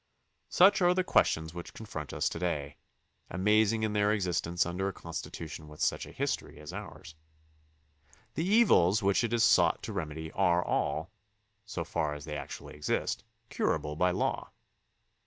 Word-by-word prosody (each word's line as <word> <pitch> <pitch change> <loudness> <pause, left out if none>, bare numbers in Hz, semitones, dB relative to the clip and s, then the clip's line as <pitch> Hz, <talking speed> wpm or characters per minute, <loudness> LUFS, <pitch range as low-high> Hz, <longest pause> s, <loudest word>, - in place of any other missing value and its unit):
Such 190 +2 +5
are 180 0 +4
the 185 - +2
questions 80 - +2
which 85 0 -8
confront 80 -10 -7
us - - 0
to - - -6
day, 75 -5 -2 0.5
amazing 110 +3 +2
in 110 -1 0
their 105 0 +3
existence 90 -4 0
under 90 +3 -2
a 100 - -3
Constitution 80 -2 -7
with 75 0 -13
such - - 0
a - - -11
history - - -3
as 75 0 -9
ours. 80 - -8 1.2
The 160 - -1
evils 115 - +4
which 100 +4 +3
it 115 - -1
is 120 -1 +2
sought - - +4
to 110 - -5
remedy 80 -3 -4
are 90 -2 +2
all, 80 +5 -1 0.5
so 90 -5 -4
far 80 -2 -2
as 75 -1 -9
they 75 -2 -5
actually 70 0 -7
exist, 75 0 -2 0.3
curable 75 0 -1
by 90 +3 +3
law. 90 - -1
90 Hz, 160 wpm, -30 LUFS, 80-105 Hz, 1.2 s, Such